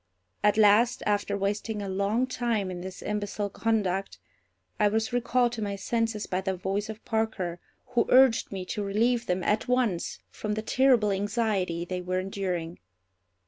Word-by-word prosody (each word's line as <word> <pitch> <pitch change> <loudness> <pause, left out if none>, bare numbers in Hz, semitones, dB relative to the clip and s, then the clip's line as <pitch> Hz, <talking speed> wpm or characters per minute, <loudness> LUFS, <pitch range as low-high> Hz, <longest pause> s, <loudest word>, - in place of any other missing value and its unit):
At 210 0 +4
last, 220 +4 +5
after 205 -1 0
wasting 205 +2 -2
a - - -4
long 200 +6 +1
time 235 -6 -1
in 175 -1 -6
this 185 0 -8
imbecile 205 -1 -2
conduct, 195 -4 -1 0.6
I 210 - +5
was 220 +3 0
recalled 245 0 +2
to 235 -2 -5
my 200 -1 -2
senses 225 +1 -1
by 185 +1 -2
the 190 -1 -2
voice 195 +4 -2
of 220 0 -8
Parker, 220 -6 -1 0.3
who 240 -2 +1
urged 255 -2 +5
me 190 -2 -4
to 210 +3 -3
relieve 230 +4 +1
them 180 0 0
at 210 +4 +1
once 245 -8 0
from 210 -1 -3
the 215 - -3
terrible 245 -4 +3
anxiety 195 -4 -1
they 180 0 -4
were 180 +1 -2
enduring. 185 -3 -3
210 Hz, 165 wpm, -27 LUFS, 190-225 Hz, 0.6 s, last